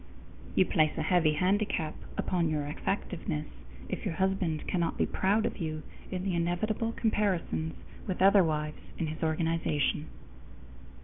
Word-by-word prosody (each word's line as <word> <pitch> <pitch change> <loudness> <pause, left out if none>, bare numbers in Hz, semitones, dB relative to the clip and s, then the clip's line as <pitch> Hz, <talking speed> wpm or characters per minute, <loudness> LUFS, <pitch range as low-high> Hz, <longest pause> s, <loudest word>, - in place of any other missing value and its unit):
_ - - -18 0.5
You 185 - +5
place 155 -3 +2
a 160 - 0
heavy 160 -2 +4
handicap 180 -2 +1 0.2
upon 170 -3 +1
your 150 -2 0
effectiveness 110 - -2 0.4
if - - -4
your 160 - -2
husband 190 -4 0
cannot 170 -2 0
be - - +3
proud 205 +3 +2
of - - -2
you 155 -2 -3 0.3
in 185 -1 -3
the 190 -1 0
inevitable 175 +7 0
comparisons 195 -8 0 0.3
with 185 - -2
other 195 0 +7
wives 150 -1 -2 0.2
in 165 - 0
his 155 +1 -5
organization. 160 -2 +1
170 Hz, 145 wpm, -30 LUFS, 155-190 Hz, 0.5 s, other